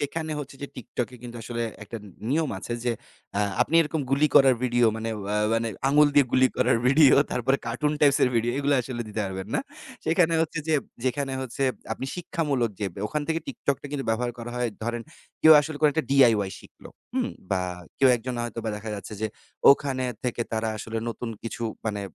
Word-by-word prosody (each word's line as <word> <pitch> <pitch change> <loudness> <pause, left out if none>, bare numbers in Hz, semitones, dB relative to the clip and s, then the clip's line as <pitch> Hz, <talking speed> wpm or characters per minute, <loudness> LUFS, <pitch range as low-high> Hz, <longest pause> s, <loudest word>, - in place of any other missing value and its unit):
সেখানে 155 +2 -3
হচ্ছে 135 -1 -9
যে - - -3
TikTok 125 0 -4
এ - - -10
কিন্তু 120 -1 -8
আসলে 120 +1 -3 0.2
একটা 110 +3 -7
নি - - -11 0.2
নিয়ম 155 0 +1
আছে 120 - -6
যে 120 - +2 0.4
অ্যা 105 - +2 0.2
আপনি 165 - -4
এরকম 160 0 0
গুলি 140 +3 +4
করার 135 -3 +7
ভিডিও 120 -1 +3
মানে 115 0 -3
ওয়া 100 +2 -3 0.2
মানে 115 0 0 0.2
আঙ্গুল 150 +1 +6
দিয়ে 145 -3 +6
গুলি 130 0 +5
করার 115 - +3
ভিডিও, 140 +1 +7 0.2
তারপরে 130 +3 +1
কার্টুন 140 +6 0
টাইপস 145 -2 +5
এর 125 - +4
ভিডিও 120 +1 +1
এগুলো 145 0 +2
আসলে 120 -1 -4
দিতে 105 +1 -3
পারবেন 95 +1 -5
না। - - +2 0.4
সেখানে 165 0 +3
হচ্ছে 165 0 -3
যে 160 - +3 0.3
যেখানে 135 +1 -1
হচ্ছে 130 +2 -4 0.3
আপনি 130 - -4
শিক্ষামূলক 145 -9 -1
যে 100 - 0
ব্যা 100 - -6
ওখান 150 -1 -2
থেকে 165 0 0
TikTok 140 +1 -1
টা - - -6 0.2
ব্যবহার 120 +2 0
করা 120 +1 -6
হয়, 125 -1 0
ধরেন 120 0 -2 0.4
কেউ 160 - +10
আসলে 150 0 -5
কোন 150 - +6
একটা 160 -1 0
DIY 115 -8 +5
শিখলো, - - -15 0.3
হুম? - - 0 0.2
বা 95 -1 +2 0.4
কেউ 135 - +6
একজন 125 +2 -5
হয়তোবা 115 -1 -4
দেখা 110 +1 -6
যাচ্ছে 100 +1 -8
যে 110 - +1 0.4
ওখানে 135 -2 +2 0.2
থেকে 120 -1 -1
তারা 110 0 0
আসলে 115 +1 -4
নতুন 115 +1 -4
কিছু 115 0 -5 0.2
মানে, 105 -2 -2
125 Hz, 200 wpm, -26 LUFS, 115-145 Hz, 0.4 s, কেউ